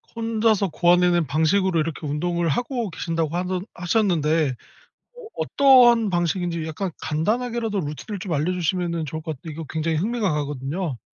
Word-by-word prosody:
혼자서 225 -3 +1
고안해 175 +2 +3
낸 170 -3 +1
방식으로 165 +5 +2
이렇게 155 0 -3
운동을 170 +3 -1
하고 240 - -1
계신다고 165 -1 -2
하는 180 0 -1
하셨는데 165 - +1 0.6
어 470 - -10
어떠한 240 -5 +5
방식인지 175 -1 -1
약간 180 +4 -3
간단하게라도 225 +6 -1
루트를 155 +7 -6
좀 175 -3 -4
알려주시면은 170 +1 -1
좋을 155 +3 -5
것 160 -1 -4
같 - - -42
이거 160 +1 -7
굉장히 160 0 -1
흥미가 210 0 0
가거든요. 145 0 -3
175 Hz, 385 characters per minute, -23 LUFS, 155-205 Hz, 0.6 s, 어떠한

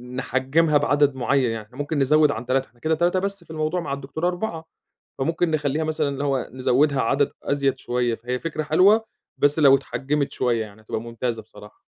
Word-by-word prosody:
نحجّمها 130 +5 +1
بعدد 145 -1 +2
معيّن، 130 -1 +1
يعني 110 -2 -5
إحنا 125 +4 -19
ممكن 145 +1 -2
نزوِّد 150 +2 +4
عن 115 +2 -6
3، 130 +1 +1
إحنا 120 - -29
كده 155 +4 +1
3 175 +3 +1
بس 200 -1 -3
في 165 - -23
الموضوع، 155 +3 -1
مع 165 - -5
الدكتورة 140 +5 -2
4، 175 -3 -4 0.5
فممكن 165 +4 0
نخلّيها 150 0 0
مثلًا 155 -1 0
اللي 140 0 -3
هو 135 -3 -1
نزوِّدها 130 +2 +2
عدد 140 +4 +1
أزيد 140 -2 0
شوية، 120 -1 -1
فهي 125 +3 -4
فكرة 155 +1 -3
حلوة 190 +9 +4 0.3
بس 145 +2 +2
لو 140 -3 +7
اتحجّمت 140 +1 -2
شوية، 120 -3 0
يعني 105 +1 -16
هتبقى 110 - -4
ممتازة 115 0 -4
بصراحة. 105 -1 -15
140 Hz, 190 wpm, -23 LUFS, 125-155 Hz, 0.5 s, لو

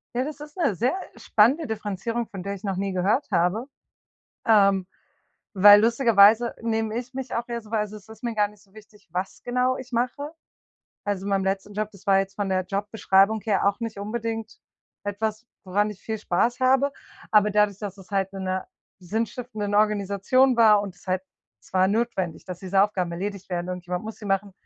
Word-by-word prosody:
Ja, 250 - +1
das 295 +1 -6
ist 295 +3 -11
'ne 335 - +2
sehr 245 - 0 0.2
spannende 265 +9 +3
Differenzierung, 220 +2 -3
von 195 - -8
der 200 +2 -4
ich 195 - -13
noch 195 -3 -2
nie 195 0 -2
gehört 195 +10 +1
habe. 180 +7 +1 0.8
Ähm, 200 -4 +4 0.7
weil 205 +1 +9
lustigerweise 230 -1 +5
nehme 225 -1 -1
ich 250 +1 -6
mich 265 -1 -5
auch 235 - -2
eher 235 -1 -4
so 215 - -16
weil 215 -1 0
es 205 - -13
es 210 -1 -12
ist 220 +2 -13
mir 235 -1 -2
gar 210 -1 +2
nicht 205 -1 -19
so 195 -2 -28
wichtig, 215 -1 -17
was 185 +2 -4
genau 250 +1 +1
ich 260 0 -9
mache. 255 +5 -2 0.7
Also 200 -2 -2
in 200 - -3
meinem 195 -1 +1
letzten 195 +1 -2
Job, 215 +1 -2
das 200 0 -17
war 195 -1 +6
jetzt 195 0 -2
von 205 -1 -2
der 185 -1 +1
Jobbeschreibung 200 +1 +2
her 200 -2 +2
auch 200 - -1
nicht 230 -3 -5
unbedingt 225 +1 -4 0.5
etwas, 215 +3 -3 0.2
woran 205 +2 0
ich 205 - -11
viel 220 -1 -3
Spaß 220 +5 0
habe, 265 +2 +3 0.4
aber 210 -1 +5
dadurch, 210 -1 +2
dass 205 -2 -6
es 190 - -15
halt 195 -1 0
in 195 -1 -6
'ner 185 0 -2 0.3
sinnstiftenden 215 +2 -3
Organisation 210 +5 +3
war 215 -3 +6
und 195 -3 -7
es 175 - -21
halt 185 0 0 0.4
es - - -22
war 185 0 +4
notwendig, 195 -6 -1
dass 180 -2 -7
diese 195 +1 +2
Aufgaben 190 -4 -1
erledigt 195 +2 -5
werden, 175 -1 -3
irgendjemand 180 +1 -4
muss 220 0 -6
sie 215 - -12
machen. 195 0 -1
210 Hz, 200 wpm, -25 LUFS, 195-230 Hz, 0.8 s, weil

